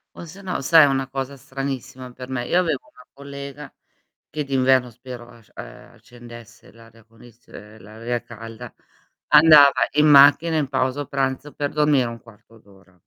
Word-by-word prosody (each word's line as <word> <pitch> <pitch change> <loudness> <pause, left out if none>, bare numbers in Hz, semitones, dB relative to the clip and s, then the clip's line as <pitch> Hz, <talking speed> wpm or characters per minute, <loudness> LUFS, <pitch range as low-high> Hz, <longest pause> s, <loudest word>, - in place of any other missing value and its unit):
O - - -10
sennò 185 +1 -7
sai 160 +3 +5
è - - +6
una 135 -1 -1
cosa 135 +1 -6
stranissima 130 -1 -7
per 125 0 -11
me? 120 -2 -4
Io 180 - +1
avevo 160 -7 -2
una 125 - -18
collega 140 +1 -10 0.6
che 150 - -5
d'inverno 130 -2 +1
spero 125 0 -11
asc 115 -2 -20
ehm, - - -12
accendesse 120 -2 -16
l'aria 115 0 -20
condiz 115 +1 -21
ehm, 105 +1 -14
l'aria 115 +4 -6
calda, 115 -1 -11 0.6
andava 150 -2 +7 0.2
in 150 +1 +3
macchina 145 +3 +5
in 145 -3 -1
pausa 130 +1 -2
pranzo 135 +1 -3
per 145 -1 -4
dormire 150 -4 +1
1/4 115 -1 -15
d'ora. 95 -3 -23
130 Hz, 155 wpm, -21 LUFS, 120-145 Hz, 0.6 s, andava